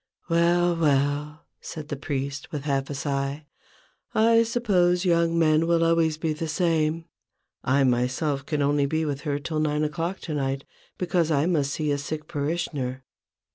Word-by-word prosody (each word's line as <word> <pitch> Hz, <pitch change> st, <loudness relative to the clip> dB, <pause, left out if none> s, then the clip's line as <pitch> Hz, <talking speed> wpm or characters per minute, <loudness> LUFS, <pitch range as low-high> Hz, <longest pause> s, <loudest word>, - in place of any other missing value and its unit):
" -, -, -36 dB
Well! 170 Hz, +1 st, +3 dB
well! 150 Hz, -1 st, 0 dB
" -, -, -54 dB
said 155 Hz, -2 st, -7 dB
the 145 Hz, -, -2 dB
priest, 140 Hz, 0 st, -4 dB
with 150 Hz, -3 st, -4 dB
half 135 Hz, -2 st, -1 dB
a 145 Hz, -, -4 dB
sigh, 140 Hz, +1 st, -2 dB, 0.4 s
" -, -, -37 dB, 0.2 s
I 230 Hz, 0 st, +6 dB
suppose 200 Hz, -7 st, +2 dB
young 170 Hz, -1 st, +2 dB
men 160 Hz, 0 st, +3 dB
will 170 Hz, -1 st, +3 dB
always 165 Hz, -2 st, +2 dB
be 160 Hz, -1 st, -1 dB
the 160 Hz, +2 st, -4 dB
same, 165 Hz, -1 st, 0 dB, 0.6 s
I 135 Hz, +2 st, +3 dB
myself 130 Hz, +3 st, 0 dB
can 145 Hz, 0 st, -1 dB
only 145 Hz, 0 st, +2 dB
be 160 Hz, +2 st, 0 dB
with 140 Hz, -2 st, -3 dB
her 145 Hz, -2 st, -1 dB
till 155 Hz, +2 st, -3 dB
nine 150 Hz, 0 st, +1 dB
o'clock 165 Hz, +5 st, -2 dB
to 160 Hz, -, -5 dB
night, 135 Hz, -1 st, -1 dB, 0.3 s
because 175 Hz, -2 st, +1 dB
I 145 Hz, -1 st, +2 dB
must 145 Hz, -5 st, +1 dB
see 150 Hz, -2 st, -1 dB
a 145 Hz, -, 0 dB
sick 155 Hz, +2 st, -5 dB
parishioner. 140 Hz, -4 st, -3 dB
155 Hz, 175 wpm, -25 LUFS, 140-165 Hz, 0.6 s, I